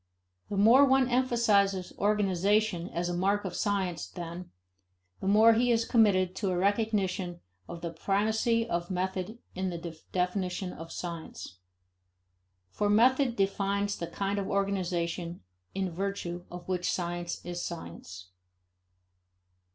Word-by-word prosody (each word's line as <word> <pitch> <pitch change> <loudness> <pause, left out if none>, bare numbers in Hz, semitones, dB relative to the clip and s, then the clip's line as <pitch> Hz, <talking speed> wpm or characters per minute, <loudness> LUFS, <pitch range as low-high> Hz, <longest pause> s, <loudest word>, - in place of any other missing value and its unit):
The 200 - -3
more 230 +7 +7
one 265 -2 +4
emphasizes 215 -7 +2
organization 205 -2 +1
as 175 +1 -2
a 175 - -2
mark 195 +3 +1
of 180 -2 -4
science, 190 -5 -1
then, 175 0 -7 0.7
the - - -4
more 220 +3 +7
he 240 +2 +2
is 230 -1 +2
committed 190 -6 +3
to 200 - -1
a 180 - 0
recognition 195 -3 0 0.3
of 170 - -7
the 170 0 -4
primacy 220 +6 +1
of 170 -3 -2
method 190 +3 -2 0.2
in 185 0 -2
the 165 -2 -7
definition 180 0 -1
of 165 +1 -9
science. 165 - -7 1.1
For 205 - 0
method 250 +4 +4
defines 200 0 0
the 170 - -5
kind 195 +4 -2
of 195 - -3
organization 180 -3 -1 0.3
in 190 -2 -1
virtue 180 -1 -4
of 175 0 -9
which 180 -1 0
science 175 -1 -3
is 175 0 -4
science. 90 - -8
190 Hz, 130 wpm, -29 LUFS, 175-205 Hz, 1.1 s, more